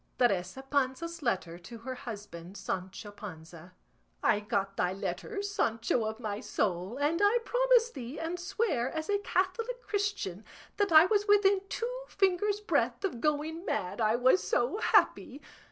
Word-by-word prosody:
TERESA 215 +1 +1
PANZA'S 285 +5 -1
LETTER 180 - -1
TO 205 +7 -10
HER 255 +3 -6
HUSBAND 205 -8 -8
SANCHO 190 +2 -5
PANZA. 170 -4 -10 0.5
I 205 - +4
got 200 -2 -2
thy 180 -1 0
letter, 400 - -4
Sancho 235 - 0
of 220 0 -4
my 210 -3 -3
soul, 190 +3 -2
and 300 +6 +1
I 410 +4 +5
promise - - +3
thee 260 +1 -7
and 335 +2 -3
swear 350 - 0
as 315 +5 -3
a 405 - +2
Catholic 425 +6 -1
Christian 400 - -2 0.3
that 405 -2 +1
I 315 +1 +9
was 415 +2 +1
within 405 -1 +5
two 475 +2 -3
fingers' 400 +2 +1
breadth 420 -1 0
of 245 -12 -3
going 310 +3 -1
mad 235 - -2
I 215 +1 +3
was 255 +9 +4
so 245 +11 0
happy. 280 - +2
270 Hz, 155 wpm, -30 LUFS, -, 0.5 s, I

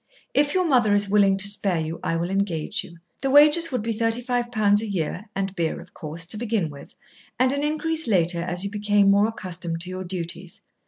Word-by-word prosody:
If 290 +2 +2
your 370 -1 +2
mother 240 -9 +3
is 205 0 +1
willing 200 -2 +4
to 195 +1 +3
spare 200 -4 +4
you, 160 +1 -4
I 165 - -1
will 170 +2 -2
engage 195 +1 -2
you. 170 - -14 0.2
The 270 - -1
wages 300 +4 +5
would 250 -4 -2
be 230 0 -2
thirty 225 +2 +1
five 245 -1 -2
pounds 210 -2 +2
a 225 - -4
year 190 +2 -4
(and 195 0 -3
beer, 165 -3 -2
of - - -15
course) 160 +2 -7
to 175 +6 0
begin 215 -8 -2
with, 140 -1 -13 0.4
and 255 +1 +2
an 280 +1 -2
increase 315 +1 -1
later 175 -4 +1
as 180 +1 -1
you 200 - -4
became 205 -1 +2
more 200 +2 +3
accustomed 180 -6 -5
to 180 +2 -1
your 185 0 -5
duties. 175 0 -7
200 Hz, 220 wpm, -23 LUFS, 175-235 Hz, 0.4 s, wages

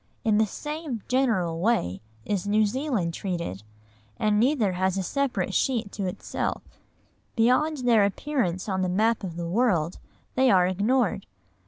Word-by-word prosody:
In 215 -3 +3
the 220 - +3
same 295 -2 -5
general 220 -11 +1
way 170 - 0 0.2
is 200 -2 -2
New 215 +1 +3
Zealand 225 - -1
treated, 170 - -4 0.6
and 210 -1 +2
neither 240 -4 +2
has 185 +1 0
a 190 - -1
separate 220 -4 -1
sheet 230 -5 0
to 195 -3 -3
itself; 180 - -3 0.7
beyond 255 +4 +2
their 225 -4 +5
appearance 200 - -1
on 190 -2 -1
the 185 - 0
map 220 +4 +1
of 175 -4 -5
the 170 0 -4
world, 180 -5 +1 0.3
they 260 0 +3
are 185 -4 +5
ignored. 200 +3 +1
210 Hz, 150 wpm, -26 LUFS, 185-250 Hz, 0.7 s, their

